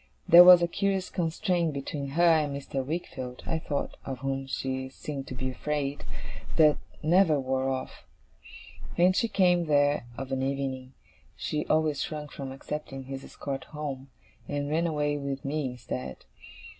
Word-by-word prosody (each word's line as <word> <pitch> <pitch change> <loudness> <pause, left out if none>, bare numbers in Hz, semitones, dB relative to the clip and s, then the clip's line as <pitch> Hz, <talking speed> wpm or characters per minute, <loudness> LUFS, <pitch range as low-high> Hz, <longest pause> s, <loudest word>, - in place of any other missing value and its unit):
There 175 +1 +11
was 180 -1 +9
a - - +3
curious 195 +1 -1
constraint 170 -1 0
between 140 0 -4
her 175 - +4
and 155 -4 +4
Mr. 135 -1 -3
Wickfield, 130 -4 -5
I 165 - -1
thought 145 -3 -3
(of 135 -1 -5
whom 135 0 -2
she 130 0 -3
seemed 135 0 -6
to 130 - -6
be 130 0 -2
afraid), 145 +1 -3 0.5
that 155 -2 +6 0.3
never 165 -2 +4
wore 130 0 0
off. 130 -1 -5 0.9
When 180 +2 +5
she 230 - +2
came 180 -5 +3
there 145 -4 +3
of 135 0 -5
an 135 0 0
evening, 135 -1 -3 0.4
she 150 0 -2
always 155 -2 +2
shrunk 150 -2 -5
from 135 -2 -6
accepting 135 0 -6
his 135 +1 -7
escort 135 -2 -6
home, 140 -3 -6 0.4
and 145 0 -2
ran 165 +2 +2
away 150 -2 0
with 140 -1 -4
me 150 +1 -1
instead. 65 - -6
145 Hz, 155 wpm, -28 LUFS, 135-160 Hz, 0.9 s, There